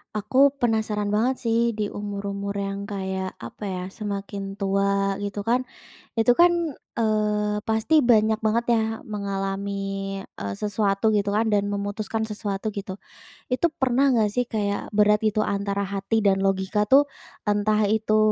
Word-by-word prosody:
Aku 255 +7 +4
penasaran 215 -3 0
banget 235 +5 +2
sih 230 0 +2 0.2
di 210 -1 -2
umur-umur 200 -1 -4
yang 200 0 -3
kayak 190 -2 -4
apa 115 - -10
ya 180 -1 -3
semakin 200 -1 -5
tua 195 0 +1
gitu 205 0 -4
kan, 250 +4 +1 0.5
itu 225 +2 +5
kan, 350 0 +7 0.4
eee, 210 -1 +1
pasti 220 +8 +3
banyak 220 0 +4
banget 220 +2 +1
ya - - +1 0.2
mengalami, 200 -1 -3 0.4
eee, 100 - -6
sesuatu 205 - +1
gitu 205 -1 +1
kan 220 0 +2
dan 205 -1 +2
memutuskan 205 +2 -2
sesuatu 210 -1 -3
gitu, 200 -2 -6 0.6
itu 260 +7 +3
pernah 265 +1 +3
gak 215 -2 +2
sih 245 0 +1
kayak 205 -2 -2
berat 210 0 +3
gitu 215 0 +1
antara 200 0 -1
hati 200 +3 -1
dan 195 -1 +3
logika 195 +1 +1
tuh, 285 +2 +7 0.4
entah 210 +1 +2
itu, 215 +1 +2
205 Hz, 145 wpm, -24 LUFS, 200-220 Hz, 0.6 s, kan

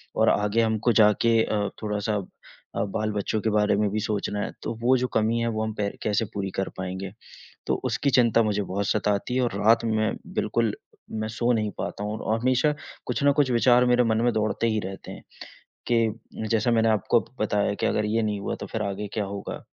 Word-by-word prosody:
और - - +4
आगे 105 +2 +2
हमको 110 +1 +1
जाके 110 +1 +4
अ, 105 -2 -1
थोड़ा-सा 105 0 -1 0.6
अ, - - 0
बाल 105 +2 -2
बच्चों 105 +1 -1
के 110 - 0
बारे 105 -1 +2
में 105 0 +1
भी 110 - -1
सोचना 105 -1 -2
है - - -2
तो - - -2
वो 125 +2 +4
जो 125 0 0
कमी 110 +1 +2
है 115 - 0
वो 110 -1 -2
हम 110 0 -3
पै 105 -1 -1
कैसे 105 +1 +1
पूरी 100 -2 -3
कर 95 - -1
पाएँगे? 95 +1 -5 0.6
तो - - +2
उसकी 140 - 0
चिंता 115 -3 +4
मुझे 105 -2 0
बहुत 100 +1 -2
सताती 105 +3 0
है 130 - +3
और 120 - 0
रात 115 +1 +5
में 110 -1 0 0.2
बिल्कुल 115 -3 0 0.4
मैं 110 0 -3
सो 120 +2 -1
नहीं 110 -2 0
पाता 105 - -4
हूँ 105 +1 -3
औ - - -12
और 110 - +2
हमेशा 130 +4 +2 0.3
कुछ - - -2
ना 140 - +6
कुछ 140 -2 +2
विचार 120 +1 +5
मेरे 125 0 +4
मन 110 -1 +1
में 120 - +3
दौड़ते 110 +1 0
ही 110 - 0
रहते 95 0 -7
हैं - - -11 0.7
कि 115 -1 -1
जैसा 115 +2 +2
मैंने 115 -1 +3
आपको 110 +1 +3 0.2
बताया 105 -1 +1
कि - - +2
अगर 105 - +1
ये 115 +2 +1
नहीं 105 -2 -1
हुआ - - -3
तो - - -5
फिर 110 - -3
आगे 100 0 -3
क्या 105 -2 0
होगा? 100 0 -6
110 Hz, 220 wpm, -25 LUFS, 105-115 Hz, 0.7 s, ना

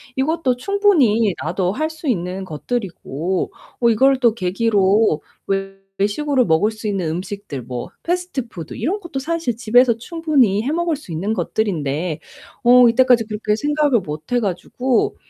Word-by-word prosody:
이것도 270 -1 +1
충분히 275 - +3
나도 185 -2 -1
할 310 +10 -2
수 315 -1 -8
있는 185 -3 -2
것들이고 180 - -3 0.3
어 235 - +4
이걸 265 +4 +4
또 235 -4 +4
계기로 200 -3 +2 0.3
외 195 0 -2 0.2
외식으로 255 +6 +1
먹을 165 +6 +2
수 215 0 -7
있는 190 -5 -1
음식들 185 -4 -5
뭐 125 +4 -6
패스트푸드 280 - -4
이런 345 - -2
것도 340 -8 -5
사실 325 -3 -2
집에서 235 +1 +3
충분히 265 - +1
해 270 - -1
먹을 340 0 0
수 275 - -11
있는 185 +7 -2
것들인데 165 -5 -2 0.4
어 245 0 +7
이때까지 245 -1 +4
그렇게 210 -1 -1
생각을 290 +1 +2
못 155 -1 -8
해 245 - +3
가지고 225 +5 -1
225 Hz, 315 characters per minute, -20 LUFS, 190-270 Hz, 0.4 s, 어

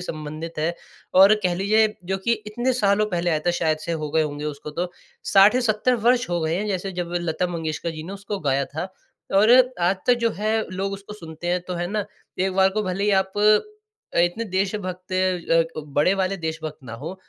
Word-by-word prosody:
संबंधित 155 +2 -6
है 165 +3 0 0.4
और 195 +3 +8
कह 180 -1 +1
लीजिए 215 +3 +2
जो 190 +2 -1
कि 235 - +3
इतने 240 +4 -1
सालों 210 -3 +2
पहले 175 0 0
आया 155 - +2
था - - +5
शायद 155 -2 +1
से 170 +2 -4
हो 155 -2 -3
गए 160 +1 +2
होंगे 145 -1 -4
उसको 150 0 -5
तो 175 +4 -3 0.3
60 195 +3 +6
या 255 - +3
70 235 +2 +2
वर्ष 245 -2 +3
हो 175 -1 0
गए 160 0 0
हैं। 210 - -2
जैसे 195 -1 -2
जब 175 -1 -4
लता 175 +1 -1
मंगेशकर 165 -1 -3
जी 155 -1 -7
ने 190 - -6
उसको 200 0 -5
गाया 140 -2 +1
था 160 +7 -5 0.5
और 205 +3 +5 0.3
आज 180 +3 +2
तक 250 - +6
जो 230 - +3
है 215 +1 0 0.2
लोग 195 +1 -3
उसको 195 +1 -8
सुनते 165 -3 -9
हैं, 180 0 +1
तो 180 0 -5
है 175 0 -2
ना, 210 +2 -2 0.3
एक 190 0 +1
बार 190 0 +5
को 215 +2 -1
भले 190 0 -2
ही 210 - +3
आप 190 - -19 0.8
इतने 175 +7 +2
देश 190 +2 0
भक्त 185 -2 -7
अ, 180 -3 +2 0.2
क 155 - -5
बड़े 150 +6 +4
वाले 195 0 0
देशभक्त 160 -2 -5
ना 115 - -8
हो, 155 +10 -6
180 Hz, 220 wpm, -23 LUFS, 165-200 Hz, 0.8 s, और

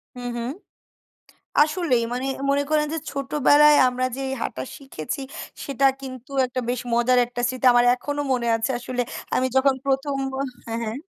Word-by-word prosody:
হুম, 245 0 -6
হুম, 235 +1 -3 1.1
আসলেই 300 -5 +1
মানে 250 +2 -2 0.2
মনে 280 +1 +2
করেন 300 -1 +2
যে, - - -1
ছোটবেলায় 290 +1 +4
আমরা 250 +1 -2
যে, 270 - -5 0.2
হাঁটা 130 - -3 0.2
শিখেছি, 270 - -6 0.4
সেটা 275 0 -1 0.2
কিন্তু 255 -1 -9 0.2
একটা 255 +1 -3
বেশ 245 0 -1
মজার 245 +2 +3
একটা 245 0 -6
স্মৃতি 255 +1 -2
আমার 240 0 +5
এখনো 290 +3 -4
মনে 245 -2 0
আছে 225 +4 -2
আসলে 245 0 -2 0.3
আমি 255 - +2
যখন 270 0 +4
১ম 275 +1 0 0.5
হ্যাঁ, 230 0 -3
হ্যাঁ 220 +1 -4
255 Hz, 155 wpm, -23 LUFS, 245-280 Hz, 1.1 s, আমার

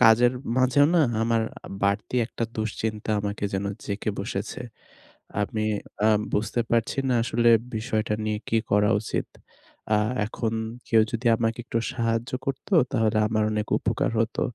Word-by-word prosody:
কাজের 120 +1 +6 0.2
মাঝেও 130 +3 +5
না 170 - +5 0.2
আমার 115 0 +2 0.4
বাড়তি 100 +5 0
একটা 115 - -3
দুশ্চিন্তা 110 0 -3
আমাকে 100 0 -3
যেন 95 +1 -1 0.2
জেঁকে 105 +1 -2
বসেছে। 100 +5 -4 0.8
আমি 110 +1 -1 0.4
অ্যা 110 - +4 0.2
বুঝতে 110 +3 0
পারছি 115 +3 +1
না, 125 - +3
আসলে 120 0 +2 0.3
বিষয়টা 110 -1 -1
নিয়ে 105 -1 -1
কি 115 - +2
করা 105 0 +4
উচিত। - - -3 0.6
অ্যা 105 - +4 0.3
এখন 115 0 -3 0.3
কেউ 115 -1 +5
যদি 120 +1 -4
আমাকে 115 +1 0
একটু 115 - -1
সাহায্য 115 0 -1
করতো 135 +9 -3 0.2
তাহলে 110 -1 +2
আমার 110 -1 +1
অনেক 105 0 -1
উপকার - - 0
হতো। 115 0 0
110 Hz, 145 wpm, -25 LUFS, 105-115 Hz, 0.8 s, কাজের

